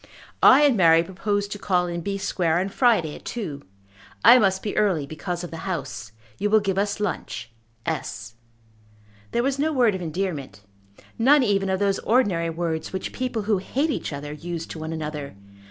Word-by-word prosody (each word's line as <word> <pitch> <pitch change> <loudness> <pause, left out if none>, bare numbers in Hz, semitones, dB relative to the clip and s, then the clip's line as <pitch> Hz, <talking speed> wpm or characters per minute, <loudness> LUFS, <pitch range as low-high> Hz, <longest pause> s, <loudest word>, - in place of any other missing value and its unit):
"I 275 +3 +8
and 285 -4 +5
Mary 165 -4 +5
propose 200 +3 -2
to 205 - -6
call 180 -3 +1
in 170 -1 -4
B. 195 +3 -3
Square 175 -4 0
on 190 +2 0
Friday 195 - +2
at - - -11
two. 165 -12 -5 0.6
I 250 - +9
must 190 -3 +1
be 210 - -3
early 185 -9 +2
because 175 +4 -5
of 175 - -7
the 165 +4 -6
House. 130 - -5 0.3
You 210 - 0
will 220 +1 +5
give 195 -2 -1
us 205 +1 -1
lunch. 145 - -4 0.3
S." 115 +2 -4 1.0
There 235 - 0
was 275 +1 -1
no 310 +2 +1
word 245 -7 +3
of 190 - -4
endearment, 155 - -4 0.6
none 275 +4 +5
even 195 -3 +1
of 190 - +1
those 200 0 +1
ordinary 200 -9 +1
words 165 -1 -3
which 190 - -4
people 250 -4 -2
who 205 -2 +1
hate 275 +11 -1
each - - -3
other 145 +1 -6
use 165 +1 -5
to 160 - -8
one 160 +1 -5
another. 150 -5 -5
190 Hz, 185 wpm, -24 LUFS, 160-210 Hz, 1.0 s, I